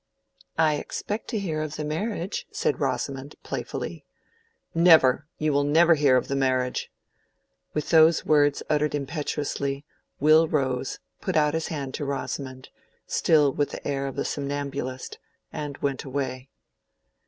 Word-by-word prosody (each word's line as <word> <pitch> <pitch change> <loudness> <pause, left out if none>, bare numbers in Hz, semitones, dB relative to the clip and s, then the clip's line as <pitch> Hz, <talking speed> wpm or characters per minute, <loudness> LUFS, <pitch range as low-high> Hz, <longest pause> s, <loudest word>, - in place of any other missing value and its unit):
"I 155 -2 +3
expect 210 +8 -4
to 225 - -2
hear 165 -7 -2
of 155 -1 -4
the 155 - -3
marriage," 185 +4 -3
said - - 0
Rosamond, 135 0 -2
playfully. - - -5 0.7
"Never! 160 -5 +5
You 155 -1 0
will 145 0 +3
never 165 +4 +5
hear 145 -4 +4
of 125 - -1
the 140 - -1
marriage!" 130 -2 0 0.9
With 150 - -2
those 160 0 +6
words 145 -2 +3
uttered 150 0 +1
impetuously, 140 -1 -3 0.3
Will 155 +3 +6
rose, 130 -4 -1 0.2
put - - -2
out 150 -1 +3
his 160 0 -1
hand 140 -4 -4
to 145 - -3
Rosamond, 135 -2 -4 0.4
still 150 -4 +3
with 145 -1 0
the - - -7
air 140 -1 -1
of 135 - -6
a - - -1
somnambulist, 140 -2 -4 0.3
and 145 -2 -5
went 140 -2 -2
away. 130 -1 -4
145 Hz, 140 wpm, -26 LUFS, 135-155 Hz, 0.9 s, those